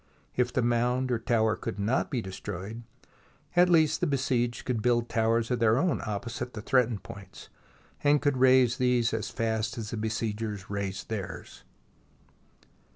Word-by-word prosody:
If 125 0 +1
the 130 - 0
mound 125 +2 +1
or 120 - +1
tower 110 -1 +2
could 95 - -5
not 105 +6 0
be 120 -4 -2
destroyed, 95 +3 -6 0.7
at 180 +1 +5
least 160 -3 +3
the - - +2
besieged 125 -4 0
could 120 -4 -1
build 120 0 +2
towers 115 +1 +1
of 125 - +1
their 115 0 +4
own 175 +2 +1
opposite 115 +3 -4
the 105 - -5
threat 125 -1 +3
ened 110 -4 -5
points, 95 -2 -11 0.5
and 145 0 +4
could 145 -2 +1
raise 130 -1 +5
these 125 -2 +2
as 110 -1 -2
fast 110 +1 -2
as 110 -3 -5
the 115 - -3
besiegers 110 -2 -3
raised 100 -1 -4
theirs. 100 -5 -6
115 Hz, 160 wpm, -28 LUFS, 110-125 Hz, 0.7 s, at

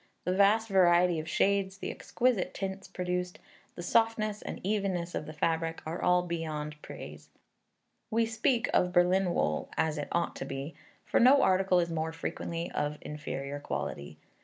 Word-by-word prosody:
The 180 - 0
vast 210 +3 +4
variety 180 -3 +4
of 155 +1 -6
shades, 195 0 +1
the - - -4
exquisite 245 -6 0
tints 195 0 -4
produced, 180 0 -3 0.4
the 175 - -6
softness 215 +1 +1
and - - -6
evenness 190 -4 -1
of 150 - -4
the - - -6
fabric, 165 +1 -1
are 180 +2 +2
beyond 155 -3 -3
all 150 - -21
praise. - - -10 0.8
We 230 +1 +2
speak 230 +2 +1
of 180 - +3
Berlin 180 +1 +3
wool 75 0 0
as 160 -1 +1
it 145 - -3
ought 170 0 0
to - - -4
be; 135 +4 -5 0.3
for - - +2
no 270 +3 +6
article 185 -1 +3
is 170 -1 0
more 160 0 -2
frequently 165 +1 -4
of 150 0 -2
inferior 145 -2 -5
quality. 75 - -5
180 Hz, 160 wpm, -30 LUFS, 160-195 Hz, 0.8 s, no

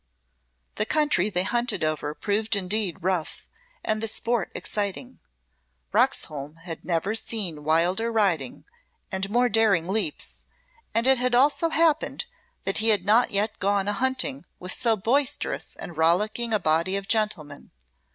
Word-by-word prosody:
The 215 - +1
country 295 - +2
they 180 -3 +1
hunted 240 +2 -1
over 155 -1 -2
proved 215 +6 0
indeed 200 -2 -1
rough, 180 -3 -2 0.4
and 215 0 0
the 225 - -1
sport 230 -2 -2
exciting. 210 +5 -3 0.7
Roxholm 150 0 0
had 165 -2 -7
never 175 +4 -1
seen 200 -9 -1
wilder 175 +9 +2
riding 185 - 0 0.5
and 190 0 -2
more 245 +3 +3
daring 205 -7 +3
leaps, 220 +10 -2 0.5
and 230 +1 +2
it 265 -1 +5
had 250 0 +1
also 290 +6 +3
happened 320 -1 +1 0.4
that 195 - 0
he 225 +1 +2
had 205 -4 +3
not 225 +4 +4
yet 205 +2 -1
gone 200 0 +1
a 205 - +1
hunting 260 +4 -1
with 180 +1 -5
so 230 -2 +2
boisterous 250 +7 -1
and 175 - -8
rollicking 210 +9 +1
a 215 - +4
body 170 +1 +1
of 195 0 -6
gentlemen. 210 -11 -1
205 Hz, 145 wpm, -25 LUFS, 180-235 Hz, 0.7 s, it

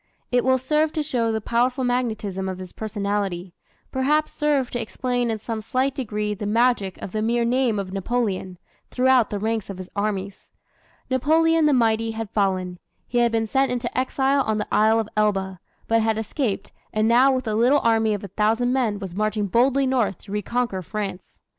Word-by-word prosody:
It 245 -1 +3
will 260 0 +3
serve 300 +4 +1
to 310 - -1
show 240 -6 0
the 220 - -1
powerful 245 +4 +1
magnetism 220 -6 -1
of 185 - -4
his 185 -1 -9
personality 200 -4 -3 0.4
perhaps 300 +4 +1
serve 290 -4 0
to 240 - -2
explain 245 +1 -2
in 220 - -1
some 220 +1 -5
slight 260 +5 0
degree 210 -5 -2
the 205 0 -5
magic 225 -3 +1
of - - -5
the 215 - -2
mere 235 +2 +1
name 245 -2 +1
of 190 -2 -4
Napoleon, 195 -3 -2 0.3
throughout 255 -3 +3
the 205 - -3
ranks 220 0 -2
of 195 - -6
his 185 -1 -9
armies. 200 -1 -3 0.6
Napoleon 320 +4 +3
the - - +4
mighty 225 -2 +2
had 225 -2 -5
fallen. 185 -3 -1 0.3
He 240 - 0
had 235 -1 +3
been 225 -1 +1
sent 270 +4 +1
into 245 -1 -3
exile 265 +2 +1
on 220 -4 0
the 210 - -2
Isle 220 +1 +4
of 220 -1 -3
Elba, 195 -3 0 0.3
but 225 0 +3
had 220 0 +1
escaped, 220 -2 -2 0.2
and 215 0 +1
now 250 +4 +5
with 255 -2 -1
a 215 - 0
little 245 +6 +4
army 225 -2 +2
of 205 - -7
a - - -5
thousand 225 +5 +1
men 235 -6 +1
was 190 -3 -7
marching 215 +1 0
boldly 260 +7 +2
north 245 -8 +1
to 200 - -11
reconquer 210 -1 -1
France. 195 0 -6
225 Hz, 190 wpm, -23 LUFS, 205-255 Hz, 0.6 s, now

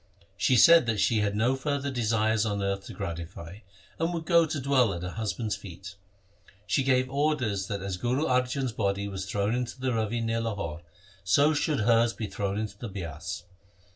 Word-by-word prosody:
She 105 +7 +2
said 165 +3 +7
that 110 -3 0
she 110 +2 +3
had 105 -1 0
no 120 +5 +2
further 140 0 -2
desires 110 -3 +1
on 100 -2 -1
earth 100 0 -2
to - - -8
gratify, 85 0 -6 0.4
and 165 +2 0
would 165 -2 -4
go 170 -1 +4
to 155 -1 -3
dwell 130 -7 +2
at 85 - -6
her 90 - -4
hus 110 -1 -2
band's 110 0 -2
feet. 100 +1 -10 0.7
She 135 - +1
gave 130 -1 +2
orders 130 -8 0
that 100 -2 -4
as 95 -2 -3
Guru 125 +9 0
Arjan's 125 0 0
body 100 -2 -1
was 95 -1 -5
thrown 100 +2 0
into 125 +1 -3
the 130 -1 -1
Ravi 115 +1 -1
near 115 0 -1
Lahore, 100 -8 -4 0.4
so 140 - +4
should 150 -3 0
hers 115 +1 +3
be 110 - -4
thrown 100 0 -3
into 110 0 -4
the 120 - -5
Bias. 85 -4 -6
110 Hz, 195 wpm, -28 LUFS, 100-130 Hz, 0.7 s, said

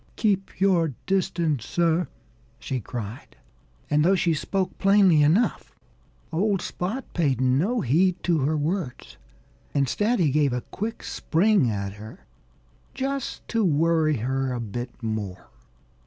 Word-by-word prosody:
"Keep 195 -3 -1
your 170 -7 +2
distance, 170 - 0
sir!" 170 +3 +1 0.5
she 130 +2 -3
cried. 115 0 -7 0.5
And 150 0 +2
though 190 +4 +4
she 170 -3 +2
spoke 185 +5 -2
plainly 195 -5 +5
enough, 165 +11 +1 0.6
old 195 +3 +1
Spot 210 +12 -4
paid 140 -8 +1
no 140 - +2
heed 170 +8 +3
to 170 -3 +2
her 150 +3 +1
words. 155 -2 -3 0.6
Instead, 205 - +1
he 160 -8 +2
gave 145 -2 +2
a 125 - -1
quick 220 - -5
spring 185 - +2
at 100 -2 -3
her, 110 - -12 0.7
just 275 0 -3
to 230 -1 +1
worry 160 -2 +2
her 130 +3 -1
a 125 - -3
bit 120 +2 -6
more. 100 - -4
160 Hz, 130 wpm, -25 LUFS, 130-190 Hz, 0.7 s, plainly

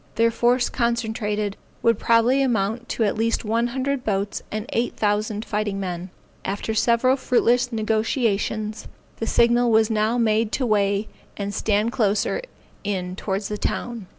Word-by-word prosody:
Their 230 0 +3
force 245 +2 +2
concentrated, 220 -4 -1 0.3
would 230 -2 +3
probably 235 +4 +3
amount 230 -2 0
to 230 - 0
at 205 - +1
least 225 +1 0
one 230 +2 +1
hundred 265 +1 -2
boats 200 -1 -1
and 215 0 -3
eight 235 +1 -1
thousand 210 +1 0
fighting 210 -2 -2
men. 180 -1 -4 0.3
After 205 +3 -3
several 235 +3 +3
fruitless 245 -1 +2
negociations, 220 -1 -1 0.3
the 225 - -3
signal 240 +1 +3
was 220 0 +4
now 220 +2 +1
made 220 -1 +2
to 260 - 0
weigh, 205 -1 +1 0.3
and 200 0 -3
stand 210 +2 +1
closer 215 - +1 0.4
in 185 -3 -3
towards 195 0 -3
the 210 -1 -4
town. 235 -5 -3
220 Hz, 150 wpm, -23 LUFS, 205-235 Hz, 0.4 s, was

